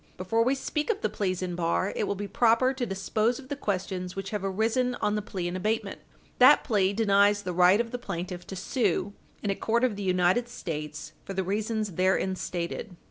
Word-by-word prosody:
Before 205 +5 0
we 260 +3 +2
speak 300 +4 -3
of 425 -2 0
the - - 0
pleas 185 -2 -1
in 180 -1 -3
bar, 175 +3 0
it - - 0
will 200 - -1
be 205 +1 -5
proper 240 +4 +3
to 255 -2 -3
dispose 215 +5 0
of 265 -1 -12
the 285 - -2
questions 185 -6 -3
which 195 0 -5
have 210 -2 -3
arisen 225 +6 0
on 210 - 0
the 210 - 0
plea 185 -3 -4
in 175 - -4
abatement. 215 +4 -2 0.4
That - - +7
plea 200 -6 +2
denies 205 -1 +3
the 180 -2 -3
right 180 +3 +5
of 230 -1 -1
the 245 - -4
plaintiff 180 -4 -5
to 190 - -6
sue 200 -1 0 0.3
in 205 - +1
a - - -1
court 235 +4 0
of 250 -5 +2
the - - -5
United 185 +5 +2
States, 150 -8 -6
for 195 - -6
the 190 - 0
reasons 215 +2 -1
therein 185 +2 +1
stated. 180 +2 -4
200 Hz, 215 wpm, -27 LUFS, 185-225 Hz, 0.4 s, That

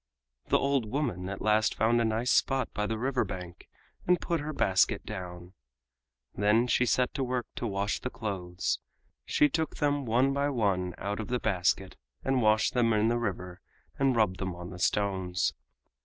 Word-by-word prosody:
The - - +4
old 140 -5 +1
woman 105 - -2
at 100 - -5
last 110 0 +3
found 115 +2 +3
a - - +2
nice 115 +3 0
spot 135 -2 +2
by 105 0 -1
the 110 - -2
river 130 +2 0
bank 90 -1 -8 0.4
and 180 0 +4
put 170 -1 -1
her 150 +1 -4
basket 95 -10 +2
down. 90 -1 -7 0.8
Then 105 +4 +3
she 125 0 +2
set 125 0 +2
to 140 - -1
work 125 -1 -1
to 120 - -2
wash 100 0 -1
the 125 - -4
clothes; 95 -7 -3 0.5
she 150 - +4
took 160 +2 -2
them 145 -2 0
one 125 +5 +3
by 140 +1 +1
one 100 -8 0
out 100 +2 -3
of 110 - -4
the 125 0 -1
basket 95 -2 0 0.3
and 135 -1 +1
washed 110 0 +3
them 120 -3 +3
in 110 +1 +3
the 120 0 +1
river 90 -5 -4 0.4
and 135 -2 +3
rubbed 105 -5 +2
them 95 -2 -3
on 90 +1 -8
the 90 - -9
stones. 95 -3 0
110 Hz, 185 wpm, -29 LUFS, 95-125 Hz, 0.8 s, The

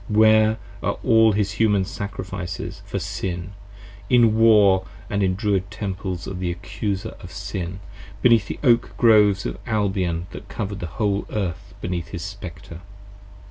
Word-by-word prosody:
where 110 0 +5 0.2
are - - -1
all 110 -1 +5
his 100 -1 0
Human 105 -4 +3
Sacrifices 95 -2 -6
For - - -3
Sin, 90 +1 -4 0.6
in 115 -3 +5
War 105 -4 +5
& - - -19
in 100 - 0
the 100 - +3
Druid 100 0 0
Temples 95 -4 -4
of 95 -2 -5
the 90 -1 -1
Accuser 95 +3 -4
of - - -10
Sin; 90 +1 -5 0.4
beneath 115 -5 +5
50 - - -5
The - - +2
Oak 120 -1 +3
Groves 105 -4 +5
of - - -4
Albion 95 -6 0
that 105 - -10
cover'd 100 -1 -4
the 90 - -4
whole 100 -2 0
Earth 95 -6 -4
beneath 90 -2 -3
his 85 -2 -6
Spectre? 100 -4 -8
100 Hz, 155 wpm, -23 LUFS, 95-110 Hz, 0.6 s, where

